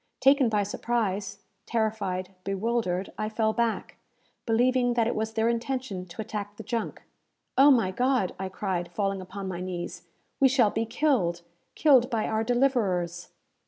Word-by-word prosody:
Taken 270 -2 +5
by 210 -2 +1
surprise, 205 -1 -2 0.2
terrified, 210 -5 -1
bewildered, 195 -2 -1
I 215 - -1
fell 220 0 +1
back, 230 0 -1 0.5
believing 245 +1 +2
that 230 -2 +3
it 235 - 0
was 220 +1 -2
their 225 0 +1
intention 235 -5 -2
to 170 +5 -7
attack 205 -1 -5
the - - -7
junk. 230 -3 -3 0.5
"Oh, 275 +2 +7
my 230 -9 +4
God!" 250 -2 +1
I 190 0 -3
cried, 180 -3 -3
falling 195 +1 -1
upon 190 +1 -7
my 180 -1 -4
knees, 180 -1 -5 0.4
"we 270 - +7
shall 245 -5 +3
be 225 0 -1
killed 230 - +1 0.3
killed 265 -5 +5
by 225 -4 0
our 220 0 0
deliverers!" 200 -9 +1
220 Hz, 155 wpm, -27 LUFS, 190-240 Hz, 0.5 s, Oh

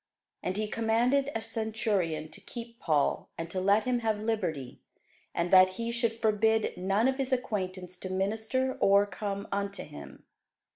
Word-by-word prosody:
And 185 - -2
he 215 0 0
commanded 235 +6 +2
a 225 - -1
centurion 205 -9 -1
to 205 - -12
keep 235 +3 -9
Paul, 150 - +1
and 165 0 -5
to 185 - -1
let 200 +3 +4
him 250 -1 +1
have 220 -2 0
liberty, 165 - -2 0.6
and 170 +1 0
that 185 0 +7
he 230 0 -2
should 235 -1 0
forbid 220 0 +2
none 195 +6 +2
of 265 +1 0
his 270 -1 -1
acquaintance 185 -7 -2
to 185 - -6
minister 220 +7 0
or 200 +1 +6
come 200 0 -4
unto 200 0 -2
him. 70 - -11
210 Hz, 160 wpm, -30 LUFS, 185-230 Hz, 0.6 s, that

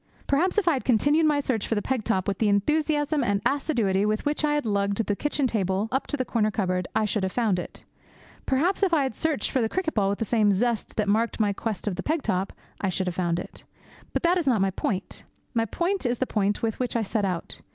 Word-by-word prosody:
Perhaps 350 +9 +1
if 425 - +2
I 340 - +5
had 265 - -2
continued 290 +7 +3
my 295 -1 +3
search 255 -6 -1
for 225 - 0
the 205 - 0
peg 260 -4 -1
top 190 -5 0
with 200 -2 -1
the 215 - +3
enthusiasm 295 +6 +1
and 200 -4 +1
assiduity 235 -9 +1
with 215 +1 0
which 295 +1 0
I 295 0 +2
had 295 - -1
lugged 200 -1 0
the 205 - 0
kitchen 295 +3 0
table 200 -2 0
up 265 +2 -1
to 290 - -2
the 255 - -1
corner 220 -3 +1
cupboard, 185 -3 -1
I 215 - +2
should 210 0 -1
have 190 0 -1
found 215 -4 +1
it. - - -8 0.6
Perhaps 325 +11 +1
if 370 -4 +3
I 290 - +3
had 265 - -2
searched 315 +4 -1
for 260 - +1
the 225 - 0
cricket 360 0 -1
ball 200 -3 +2
with 200 - -1
the 225 - -2
same 215 -2 +3
zest 230 +3 0
that 215 -1 0
marked 225 +4 +1
my 205 -2 +2
quest 215 0 -4
of 185 -4 -1
the - - -2
peg 310 - -1
top, 185 +1 -1 0.3
I 195 - +1
should 185 +1 -1
have 180 -2 -3
found 175 -2 0
it. 175 - -8 0.5
But - - -2
that 350 +2 +3
is 325 - -3
not 240 -5 +3
my 195 0 +2
point. 190 +1 -3 0.3
My 225 -2 +1
point 350 - -1
is 240 0 0
the 260 - 0
point 205 -3 0
with 225 -1 -1
which 250 -1 -2
I 230 - +1
set 210 +1 -1
out. 180 -4 -3
225 Hz, 255 wpm, -26 LUFS, 200-285 Hz, 0.6 s, I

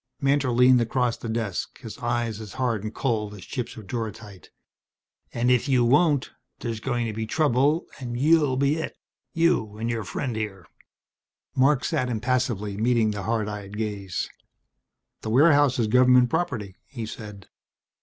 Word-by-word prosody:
Mantor 140 -1 +2
leaned 125 +1 +5
across 120 0 0
the 115 - -7
desk, 110 -4 -3
his 115 -4 -9
eyes 120 -2 -2
as 105 -3 -9
hard 120 -6 -1
and 110 - -4
cold 110 -5 -2
as 95 - -11
chips 125 -4 -5
of 110 - -9
duratite. 105 -2 -6 0.8
"And 120 +1 +1
if 125 +3 +2
you 125 -3 +4
won't, 145 +2 +3 0.3
there's 115 -2 -4
going 120 +2 -1
to 110 - -3
be 110 +1 -4
trouble 145 +3 +2
and 120 -2 -4
you'll 150 -2 +3
be 140 +3 +2
it 160 - -5 0.4
you 165 -11 +1
and 115 +2 -2
your 115 -2 -2
friend 120 +5 -3
here." 100 -5 -4 0.9
Marc 135 +1 +3
sat 125 0 0
impassively, 115 -4 -1
meeting 115 -1 +2
the 105 -1 -4
hard 110 0 -1
eyed 105 -1 -6
gaze. 100 -6 -3 0.9
"That 110 - -5
warehouse 145 +1 +5
is 115 - +2
government 125 +1 +5
property," 110 - -2
he 120 -5 -6
said. 105 -2 -9
120 Hz, 160 wpm, -25 LUFS, 110-130 Hz, 0.9 s, leaned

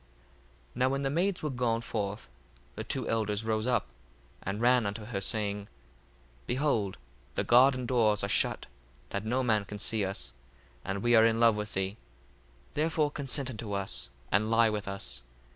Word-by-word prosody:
1:19 - - -31 0.7
Now 130 +1 +3
when 135 +1 -1
the 135 - 0
maids 175 +4 0
were 150 - -1
gone 120 -3 0
forth, 105 -2 -3 0.5
the - - -5
two - - -2
elders 110 -1 0
rose 110 +1 0
up, 125 - +2 0.6
and 100 +2 -3
ran 120 -1 +4
unto 105 +2 -5
her, 105 -4 -4
saying, 105 0 0
1:20 - - -21 0.8
Behold, 120 -8 0 0.4
the - - +1
garden 125 +1 +5
doors 110 -5 +2
are - - +1
shut, 100 - +1 0.5
that 100 +2 -3
no 125 +4 +1
man 110 -4 +2
can 105 +1 -8
see 110 +1 0
us, 95 -10 -4 0.5
and 100 +1 -3
we 120 0 +3
are 110 - +7
in 115 0 +1
love 115 -2 +5
with 105 0 -4
thee; 95 +2 -1 0.8
therefore 155 -1 +1
consent 140 -2 +1
unto 110 -3 -5
us, 100 -10 -3 0.2
and 105 +3 +2
lie 115 -1 +4
with 105 -2 -3
us. 100 -9 -5
110 Hz, 175 wpm, -30 LUFS, 100-125 Hz, 0.8 s, are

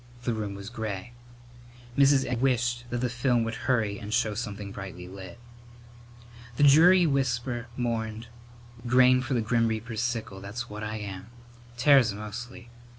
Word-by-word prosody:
The 120 - 0
room 105 -3 -4
was 100 +2 -8
gray. 110 -1 -5 0.8
Mrs. 140 0 +4
Egg 125 -2 -2
wished 120 -2 +1
that 120 0 -2
the 125 - +1
film 120 0 +1
would 115 0 -3 0.2
hurry 110 -5 +1
and 105 -2 -7
show 110 -2 +1
something 105 -3 -5
brightly 95 -2 -8
lit. 95 +3 -10 1.2
The 145 - +1
dreary 170 +6 +7
whisper 125 -4 -1
mourned, 115 -2 -2 0.6
"Grain 125 +1 +5
for 130 0 -2
the 120 - +1
grim 115 +1 +1
reaper's 110 0 -3
sickle, 115 -5 -3
that's 110 +5 -6
what 105 -1 -8
I 110 0 -4
am. 100 -2 -7 0.5
Tares 125 -5 +5
mostly. 120 +3 -8
120 Hz, 150 wpm, -27 LUFS, 105-125 Hz, 1.2 s, dreary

